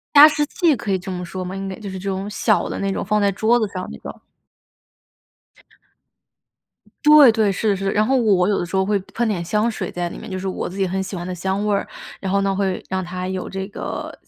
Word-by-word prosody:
加 290 +1 +12
湿 300 -1 0
器 325 0 +2
可 205 - -5
以 190 - +2
这 180 - -10
么 180 -1 -4
说 185 +1 -5
吗？ 185 +1 -5
应 195 0 -4
该 190 - -6
就 210 - -7
是 190 - -6
这 195 +1 -3
种 195 +1 -3
小 210 0 +1
的 - - -4
那 195 0 0
种 - - -3
放 210 +1 +1
在 200 - +3
桌 220 +5 +2
子 215 - 0
上 185 -1 -5
那 - - -8
种。 - - -9 2.8
对， 300 -5 +8
对， 220 -2 +2
是 205 +2 +1
是， 195 0 -2
然 215 +1 +2
后 270 - +2
我 220 -5 +3
我 180 0 +3
有 200 - +2
的 175 - -2
时 190 +2 -3
候 190 - +3
会 205 0 +1 0.2
喷 240 0 0
点 190 -6 -1
香 210 +6 +1
水 195 -4 -4
在 175 -1 -3
里 - - -8
面， 220 - -9
就 185 - -3
是 190 - -5
我 190 - -3
自 185 - -9
己 195 - +1
很 190 +1 -2
喜 190 0 -6
欢 175 0 -5
的 185 - -4
香 190 +3 -2
味 210 - +2
儿， 200 - -1 0.3
然 190 - -3
后 200 +1 +2
呢， 195 0 +1
会 190 -2 -1
让 190 0 -1
它 180 +1 -5
有 185 -1 -4
这 190 0 -4
个 205 - -6
195 Hz, 280 characters per minute, -21 LUFS, 185-210 Hz, 2.8 s, 加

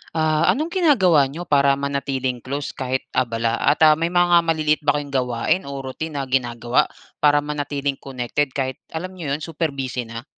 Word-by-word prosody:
Ah, 155 0 +2
anong 315 +4 -3
ginagawa 190 - +4
niyo 160 +6 -7
para 140 -3 +3
manatiling 135 -2 -2
close 140 +4 -4
kahit 130 0 -3
abala 115 -2 0
at 145 +3 +3
ah, 155 - +8
may 165 - +1
mga 175 0 +4
maliliit 155 -2 +1
ba 145 - +3
kayong 145 -1 -4
gawain 125 +5 0
o 140 -1 -5
routine 150 +4 -6
na 140 - -1
ginagawa 120 -2 +1 0.3
para 145 -1 +4
manatiling 145 -1 -3
connected 135 +1 -3
kahit 130 -2 -2 0.2
alam 180 +3 -4
niyo 160 -7 -3
'yon, 150 - -8
super 165 +1 -2
busy 125 -3 -4
na? 115 +1 -7
140 Hz, 180 wpm, -22 LUFS, 130-160 Hz, 0.3 s, ah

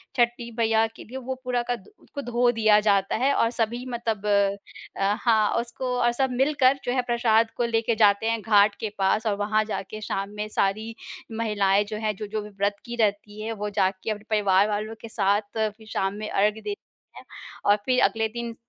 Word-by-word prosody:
छठी 240 -1 0
मैया 225 -1 +3
के 225 - -13
लिए, 255 +4 -8
वो 260 0 -4
पूरा 250 -1 0
का 245 - 0
दु 245 - -16
उसको 285 - -7
धो 240 -1 +2
दिया 215 -2 +4
जाता 200 -2 +2
है, 265 +5 +2
और 230 - +2
सभी 240 +1 -2
मतलब 230 -4 -3
अ, 200 -1 +2 0.4
अ 195 +1 +3
हाँ, 220 -3 +3
और 235 - +1
उसको 250 +1 -4
और 240 0 +3
सब 265 +2 0
मिलकर 270 +1 +3
जो 245 - -1
है 255 0 +1
प्रसाद 230 -2 +2
को 240 - +1
लेके 230 0 0
जाते 210 0 +4
हैं 230 0 0
घाट 205 -1 +4
के 220 - -3
पास, 195 +3 +1
और 205 - +1
वहाँ 215 +1 +1
जाके 215 0 -5
शाम 195 -1 -3
में 210 0 -3
सारी 215 +3 -1 0.4
महिलाएँ 205 -3 +1
जो 215 +1 -5
हैं, 215 -1 -2
जो-जो 210 +2 -4
भी 210 - -9
व्रत 200 0 -1
की 240 -1 -5
रहती 210 -1 -1
हैं, 220 +1 -3
वो 210 -1 -4
जाके 190 0 -1
अपने 210 -1 -5
परिवार 205 -2 +3
वालों 215 +2 -3
के - - -8
साथ 200 -1 +2 0.2
फिर 220 0 -2
शाम 195 -2 -1
में 215 +1 -6
अर्घ 210 +2 +2
देती 405 - -5 0.4
हैं। - - -11 0.4
और 205 - +6
फिर 255 -1 +2
अगले 225 0 +2
दिन 235 +1 -6
220 Hz, 210 wpm, -25 LUFS, 205-235 Hz, 0.4 s, और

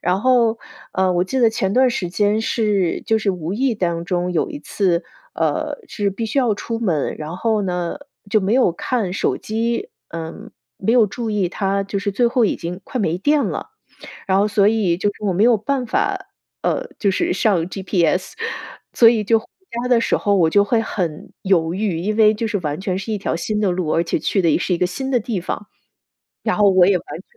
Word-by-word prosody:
然 180 +2 0
后 235 -2 +3 0.3
呃 185 -1 +2
我 175 0 +2
记 190 +9 -2
得 235 -3 +5
前 195 -3 -1
段 255 +3 +4
时 185 -7 -2
间 205 +3 +1
是 210 -6 0
就 225 - +3
是 215 -2 +1
无 175 -2 -4
意 245 +2 0
当 170 -3 -1
中 180 0 -1
有 170 - 0
一 290 - -6
次 185 -10 0 0.3
呃 - - -1
是 205 -2 -1
必 225 +4 -4
须 220 - -1
要 240 -4 +2
出 225 +2 -4
门， 170 -10 0
然 155 +3 -6
后 220 +1 0
呢 180 +5 -2 0.3
就 215 +1 +3
没 200 +3 +1
有 255 -9 +4
看 205 +1 -2
手 195 - 0
机， 235 - -2 0.2
嗯， 165 -1 -7 0.3
没 195 - -1
有 235 -2 +5
注 225 +3 -4
意 205 -4 0
它 195 +1 -1
就 200 0 -3
是 200 0 -1
最 240 +5 +2
后 235 0 +2
已 210 - +1
经 180 +2 -6
快 255 - -5
没 175 -7 0
电 290 +8 +2
了。 - - -4 0.6
然 190 -1 +2
后 205 - +3
所 205 -1 +3
以 210 -6 +2
就 205 - +1
是 210 - -14
我 200 - +1
没 185 +4 +2
有 240 0 +6
办 255 +5 -1
法， 385 - 0 0.5
呃， - - -1
就 200 - +1
是 190 - 0
上 195 -2 +2
GPS， 185 -2 0 0.6
所 230 - +6
以 225 -2 +4
就 225 +2 +3
回 225 - -16 0.4
家 250 - -2
的 245 -2 +4
时 - - +1
候 205 -2 +1
我 170 -4 +4
就 200 +4 +4
会 225 +2 +2
很 175 -8 -4
犹 170 -4 +2
豫， 190 -3 -1
因 210 +5 -2
为 215 -1 +6
就 220 +2 -3
是 215 -2 -1
完 150 -1 -3
全 185 -1 -1
是 220 +3 -4
一 - - -1
条 200 - -2
新 210 +6 -2
的 200 -3 +2
路， 175 -3 -1
而 165 - +2
且 165 - -1
去 190 +5 0
的 170 - +3
也 150 - +3
是 180 - -1
一 - - +1
个 180 - +2
新 265 +9 -4
的 250 -3 +2
地 215 -3 -2
方， 195 +3 -5 0.7
然 - - 0
后 205 -2 +5
我 185 -1 +5
也 195 -2 +4
完 - - -12
全 - - -12
200 Hz, 250 characters per minute, -20 LUFS, 180-225 Hz, 0.7 s, 有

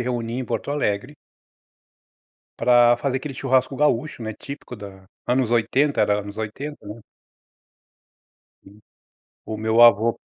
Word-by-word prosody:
reunia 120 -1 -3
em - - -4
Porto 140 - -4
Alegre 135 -1 -2 1.5
para 120 -1 +5
fazer 130 +1 -2
aquele 135 +1 -6
churrasco 130 0 +1
gaúcho, 145 -2 0
né, 110 - -4
típico 140 +1 -9
da 95 -2 -11 0.2
anos 125 -2 +1
80, 130 +5 +1
era 105 0 +2
anos 100 0 -9
80, 130 +5 -6
né. 105 +3 -9 1.6
Hum. 100 +2 -18 0.7
O 110 - -5
meu 110 +2 +2
avô 115 0 +5
120 Hz, 130 wpm, -22 LUFS, 110-130 Hz, 1.6 s, para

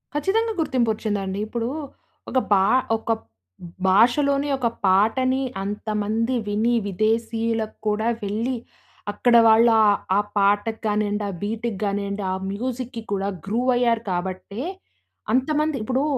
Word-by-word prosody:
ఖచ్చితంగా 440 +9 +1
గుర్తింపు 255 -7 +1
ఒచ్చిందండి. 205 -3 -3
ఇప్పుడు 235 +1 -3 0.6
ఒక 260 - -1 0.2
భా 190 -1 +4 0.3
ఒక 225 - -3 0.8
భాషలోని 275 +8 +3
ఒక 250 -3 0 0.2
పాటని 225 +8 +3 0.2
అంతమంది 215 +4 -1
విని, 220 +4 +1
విదేశీయులకు 225 +2 -1
కూడా 210 +2 +1 0.2
వెళ్లి, 225 +6 -1 0.6
అక్కడ 240 +3 +2
వాళ్ళ 225 +2 +6 0.2
ఆహ్, 205 - +4 0.2
ఆ - - +5 0.2
పాటకి 205 +3 +2
కానియండి, 210 0 0
ఆ - - -3
బీట్‌కి 220 +1 -3
గానియండి, 200 0 -2
ఆ 185 - 0 0.2
మ్యూజిక్‌‌కి 245 +2 -4
కూడా 195 0 -1 0.2
గ్రూవ్ 235 +6 0
అయ్యారు 235 -2 +2
కాబట్టే 185 +5 -4 0.7
అంతమంది 300 +3 +1
ఇప్పుడు 260 +4 0
225 Hz, 120 wpm, -23 LUFS, 205-250 Hz, 0.8 s, వాళ్ళ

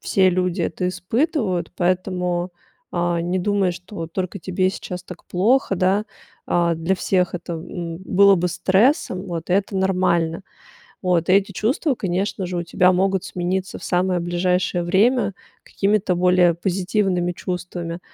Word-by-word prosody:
все 190 -1 +3
люди 180 0 0
это 180 +3 -1
испытывают, 185 - -1
поэтому, 180 -1 0 0.4
а, 175 -1 0
не 175 +2 -1
думай, 195 -1 +1
что 180 +4 -11
вот 165 0 -5
только 185 +1 -3
тебе 185 +1 0
сейчас 180 -2 -7
так 180 - -12
плохо, 210 +4 +2
да. 190 +4 +1 0.4
А, 170 -1 +2
для 165 +4 0
всех 180 -1 0
это 170 -1 -4
б 160 - -10
м, 170 -3 -5
было 200 0 +5
бы 180 +1 0
стрессом, 190 - +1
вот 170 -2 -5
и - - +3
это 195 0 +1
нормально. 185 -3 +1 0.6
Вот 175 -2 +1
эти 195 +1 +3
чувства, 260 - 0
конечно 190 -1 -2
же, 180 0 -4
у 170 - -1
тебя 180 +2 +3
могут 190 0 +1
смениться 185 +1 -3
в - - -11
самое 180 0 +1
ближайшее 175 +1 0
время 200 +4 +2 0.3
какими-то 195 -2 0
более 180 -1 +4
позитивными 180 0 0
чувствами, 175 -1 -5
180 Hz, 150 wpm, -21 LUFS, 175-195 Hz, 0.6 s, было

